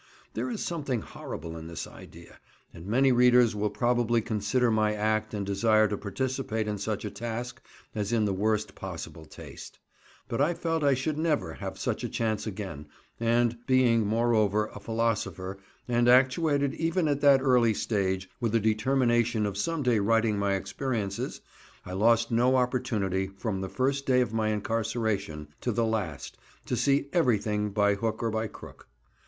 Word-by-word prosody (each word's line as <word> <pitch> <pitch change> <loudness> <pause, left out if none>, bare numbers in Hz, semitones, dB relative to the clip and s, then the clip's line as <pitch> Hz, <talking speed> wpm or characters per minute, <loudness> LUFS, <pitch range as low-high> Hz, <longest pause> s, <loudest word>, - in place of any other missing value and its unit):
There - - -2
is 230 -4 -3
something 140 -9 -2
horrible 80 -4 -7
in 80 0 -8
this 85 -1 -5
idea, - - -14 0.3
and 85 +3 -10
many 130 +5 +3
readers 125 -2 +5
will 105 0 0
probably 120 +1 +1
consider 115 +2 0
my 110 -1 +2
act 110 +1 0
and 105 -2 -3
desire 110 +2 +3
to 105 - -1
participate 110 +2 -3
in 105 -1 -3
such 105 +1 -3
a 105 - -4
task 120 +2 -5 0.3
as 105 -1 -2
in 115 -2 +2
the 100 - 0
worst 105 +2 0
possible 80 - -8
taste, - - -11 0.5
but 115 - -2
I 165 +4 +2
felt 165 -2 -1
I 140 -2 +4
should 150 +4 -2
never 150 - 0
have - - -6
such - - -2
a - - -2
chance 110 -1 -1
again, 95 -8 -6 0.3
and 120 0 +2
being, 125 -3 +4
moreover, 110 -2 +2
a - - -8
philosopher, 105 -4 -2 0.3
and 120 0 +2
actuated, 140 +2 +3
even 165 +1 0
at 145 -1 0
that 140 -1 +6
early 120 -4 +4
stage, 95 -4 -1
with 115 -2 0
a - - +5
determination 120 0 +2
of 100 -2 -3
some 160 +9 -1
day 120 -4 +3
writing 110 0 +2
my 100 -1 +1
experiences, 100 +1 -3 0.4
I 90 - -7
lost 115 +4 +3
no 125 +3 +3
opportunity 115 -7 0
from 100 0 -4
the 95 - -4
first 135 +4 -1
day 125 -1 +4
of 120 -3 -1
my 110 -1 0
incarceration 105 -7 -2
to 120 - -1
the 115 +1 +1
last 100 - -3 0.3
to - - -1
see 140 0 +2
everything 105 - +1
by 100 0 +2
hook 110 +3 -2
or 115 - 0
by 110 0 -1
crook. - - -13
115 Hz, 170 wpm, -28 LUFS, 105-125 Hz, 0.5 s, that